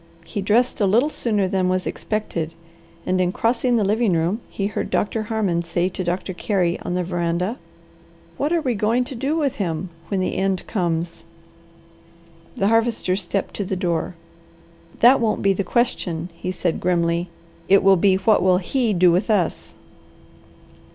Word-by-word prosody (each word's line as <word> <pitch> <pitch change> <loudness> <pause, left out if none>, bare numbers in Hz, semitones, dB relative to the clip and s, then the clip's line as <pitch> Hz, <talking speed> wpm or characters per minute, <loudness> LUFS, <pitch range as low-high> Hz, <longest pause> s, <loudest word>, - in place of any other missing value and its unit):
He 205 +4 -4
dressed 225 +4 +1
a 200 - +4
little 240 +10 +3
sooner 210 -8 0
than 185 -1 0
was 185 0 0
expected 170 -7 -3 0.5
and 185 0 +1
in 180 -1 +1
crossing 240 +4 +1
the 220 - +2
living 210 0 +2
room 170 +7 0
he 195 - -3
heard 200 - -3
Doctor 220 +2 0
Harmon 210 -6 -1
say 175 +1 -1
to 185 - -4
Doctor 180 +2 -2
Carey 180 -2 0
on 175 - -4
the 180 - 0
veranda, 175 +5 -2 0.8
"What 290 +3 -1
are 340 -1 +2
we 255 -3 +1
going 225 +4 +1
to 270 - -7
do 270 +5 -1
with 280 -4 0
him 175 -2 -2 0.2
when 195 - -1
the 185 - -1
end 190 -1 0
comes?" 170 -5 -2 1.3
The 195 - +2
Harvester 225 -4 +1
stepped 195 0 -3
to 205 - -1
the 190 0 -3
door. 175 -1 -2 0.9
"That 250 +3 +7
won't 225 -3 0
be 195 0 +4
the 200 - -1
question," 180 -8 -1
he 175 +2 -5
said 180 -2 -1
grimly. 170 -1 0 0.4
"It 195 +1 +5
will 195 0 +6
be 190 +1 +3
what 200 +3 +3
will 185 0 +4
HE 225 +4 0
do 180 -1 +5
with 180 +7 +1
us?" 195 -6 0
190 Hz, 170 wpm, -22 LUFS, 175-220 Hz, 1.3 s, That